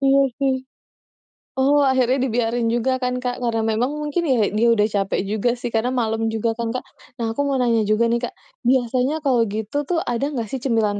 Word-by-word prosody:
Iya 275 0 +4 0.2
sih. 270 -1 +2 1.0
Oh 280 +2 +3
akhirnya 260 0 +2
dibiarin 235 0 0
juga 240 +3 +1
kan 250 0 -1
Kak, 250 0 -2
karena 225 -2 0
memang 225 +4 0
mungkin 300 +3 -2
ya, 235 -6 +2
dia 235 +2 +3
udah 210 -1 +3
capek 195 -1 0
juga 215 +4 0
sih, 240 -1 -5
karena 225 +2 +1
malam 225 0 -1
juga 225 +1 0
kan, 235 -1 -2
Kak. 255 - -3 0.3
Nah 230 -3 -2
aku 255 - -2
mau 275 - 0
nanya 235 -3 +2
juga 215 +2 +2
nih 235 - +2
Kak, - - -12 0.3
biasanya 260 +4 +1
kalau 255 -4 +3
gitu 215 +6 -4
tuh 345 -2 +1
ada 240 +2 -1
nggak 230 -2 -2
sih 265 - -3
cemilan 225 -5 0
240 Hz, 200 wpm, -21 LUFS, 225-265 Hz, 1.0 s, Iya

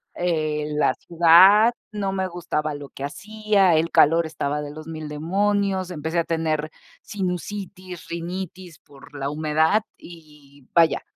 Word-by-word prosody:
eh, 155 -4 -1
la 140 -3 +2
ciudad, 185 +7 +6 0.2
no 200 -2 -2
me 190 -1 -2
gustaba 155 -4 -3
lo 145 -1 -9
que 135 - -9
hacía, 205 +3 +1
el 160 +2 +1
calor 165 +3 +4
estaba 150 -2 -3
de 145 - -6
los 155 +1 -10
1000 155 -1 -6
demonios, 190 +4 0
empecé 160 +1 -2
a - - +2
tener 155 -2 -1 0.3
sinusitis, 185 -1 -6
rinitis 175 0 -6
por 145 +1 -17
la 140 0 -3
humedad 155 +7 +1
y, 150 -5 -16
vaya, 165 -1 +4
165 Hz, 140 wpm, -23 LUFS, 150-185 Hz, 0.3 s, ciudad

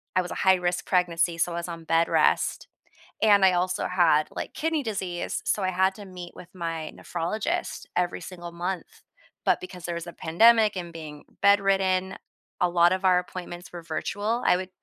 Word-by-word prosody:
I 185 - +4
was 175 - -7
a - - -4
high-risk 180 -2 +2
pregnancy, 170 -2 +1
so 175 +1 +1
I - - -4
was 170 0 -4
on 165 -1 -7
bed 165 +1 +2
rest. - - +1 0.6
And 205 -2 +6
I 190 -1 +6
also 180 +1 0
had, 165 -4 +3
like, - - -6
kidney 315 -1 -1
disease, 190 -6 -3
so 205 - 0
I 185 - +1
had 190 +1 +2
to 205 - -10
meet 180 -2 -9
with 175 - -12
my 165 -3 -4
nephrologist 175 +5 -3
every 180 0 0
single 175 -2 -8
month. 175 +2 -5 0.4
But - - +3
because 180 -1 -9
there 170 - -3
was 170 0 -6
a 170 - -8
pandemic 220 +7 +4
and 175 -2 -6
being 155 -2 -9 0.2
bedridden, 195 -2 +3 0.4
a 180 - +3
lot 175 0 +4
of 190 +1 -3
our 185 -1 +5
appointments 180 -1 -8
were 175 - -7
virtual, 205 +8 -2
I - - +5
would 185 0 -5
180 Hz, 190 wpm, -26 LUFS, 170-190 Hz, 0.6 s, And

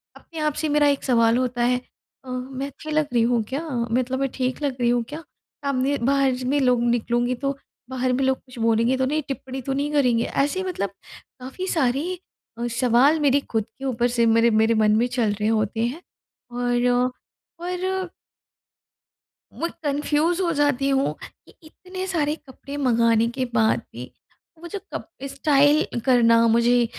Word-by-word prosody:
अपने 325 -2 -11
आप 305 -1 0
से 310 - 0
मेरा 295 0 +3
एक 280 -1 +1
सवाल 230 -2 +3
होता 250 -1 -1
है, 250 +1 +1 0.4
अ, 255 - -10
मैं 260 +2 -4
अच्छी 310 +3 -9
लग 305 -1 +1
रही 235 -1 +3
हूँ 235 -2 +2
क्या? 275 +4 -2 0.3
मतलब 255 +2 0
मैं 275 -1 0
ठीक 255 +1 -2
लग 280 -3 -1
रही 240 - +3
हूँ 240 -1 +2
क्या? 315 +2 -7 0.4
सामने 275 +1 0
बाहर 275 -1 +3
ज 250 - -6
में 285 +2 +2
लोग 250 -2 +3
निकलूँगी 240 +1 0
तो 275 +2 -3 0.3
बाहर 255 -1 -1
में 265 +2 0
लोग 265 0 +2
कुछ 255 -2 -17
बोलेंगे 230 +3 +2
तो 260 - +1
नहीं? 305 +4 0
टिप्पणी 265 -1 -5
तो 270 +2 -3
नहीं 285 +2 -1
करेंगे? 250 -6 +2
ऐसे 290 +7 -1
मतलब 355 - -3 0.5
काफ़ी 270 +9 -6
सारे 270 -6 +1
ही 360 +3 -4 0.4
अ, 240 - -1
सवाल 250 +5 +3
मेरे 285 -2 +3
ख़ुद 225 -2 +1 0.2
के 270 - -6
ऊपर 240 -2 +1
से 235 -1 +2
मेरे 230 +1 +4
मेरे 220 +1 +3
मन 215 -1 +3
में 235 - +3
चल 240 -4 0
रहे 210 +1 -2
होते 220 0 0
हैं 285 +9 -4 0.5
और 245 0 0 0.7
और 365 +1 -3 1.4
मू 335 - -2 0.2
कन्फ्यूज़ 300 +4 0
हो 345 -2 +1
जाती 285 -2 +1
हूँ 270 0 +1
कि - - -15
इतने 370 +4 -8
सारे 310 -4 0
कपड़े 280 -1 -11
मँगाने 230 -4 +3
के 255 - 0
बाद 220 -2 +3
भी - - -8 0.5
वो 345 - -8
जो 405 +3 -5
कप - - -6 0.2
स्टाइल 285 -1 +2
करना, 230 -3 +5
मुझे 235 +1 +3
260 Hz, 180 wpm, -23 LUFS, 240-290 Hz, 1.4 s, करना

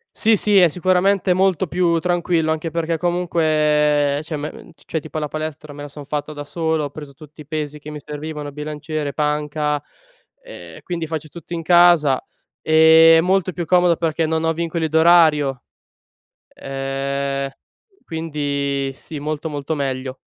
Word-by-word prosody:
Sì, 225 0 +3
sì, 205 0 +3
è 180 -2 +7
sicuramente 185 +3 +2
molto 190 0 +2
più 170 0 +1
tranquillo, 170 -2 0
anche 160 +1 -3
perché 165 0 -2
comunque 150 -4 +1
cioè 155 0 -5
me 150 +1 -4
ehm, - - -13
cioè 160 - -5
tipo 155 +1 -7
la 150 - -2
palestra 155 -1 -6
me 145 - -10
la 145 - -7
son 145 +1 -10
fatta 150 +1 -4
da 145 0 -6
solo, 160 0 -1
ho 145 - -5
preso 145 -1 -10
tutti 155 +1 -15
i 150 - -11
pesi 150 -1 -4
che 150 - -12
mi 150 - -7
servivano, 150 0 -7
bilanciere, 150 0 -5
panca, 150 0 -1 0.6
ehm, - - -11
quindi 170 -2 -4
faccio 155 -1 -5
tutto 170 +2 -9
in 165 - -4
casa, 170 -5 +5 0.4
ehm, 160 +1 +6
è - - +6
molto 185 0 +1
più 175 - -3
comodo, 175 0 +3
perché 160 0 0
non 160 0 -1
ho 165 - +2
vincoli 165 0 -2
d'orario; 155 -5 +4 0.9
ehm, 135 0 -3 0.5
quindi 140 -4 -2
sì 150 +3 -9
molto, 155 +2 -4
molto 145 0 -4
meglio. 130 -2 -3
155 Hz, 160 wpm, -20 LUFS, 145-170 Hz, 0.9 s, è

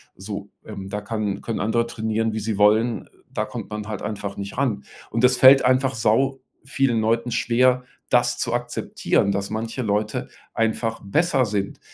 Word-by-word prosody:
So, 100 +1 -7 0.2
ähm, 100 -3 -7
da 105 +1 -3
kann 105 -1 -3
können 115 - -3
andere 115 +2 +1
trainieren, 110 -1 -1
wie 110 - -2
sie 110 -1 -2
wollen, 110 +3 +3 0.2
da - - -1
kommt - - -7
man 105 0 -5
halt 105 -3 -5
einfach 100 -1 -4
nicht 100 0 -6
ran. 120 -7 0 0.3
Und 115 +2 -1
das 125 0 +5
fällt 135 +2 +8
einfach 130 +1 +2
sau 130 +4 +1 0.2
vielen 130 -2 +1
Leuten 115 +2 0
schwer, 125 +1 +2 0.3
das 120 0 +3
zu 120 - -2
akzeptieren, 120 -4 0
dass 100 0 -2
manche 115 +3 -3
Leute 105 -1 -1 0.3
einfach 115 0 -1
besser 135 - +2
sind. 100 -2 -3
115 Hz, 170 wpm, -23 LUFS, 105-125 Hz, 0.3 s, fällt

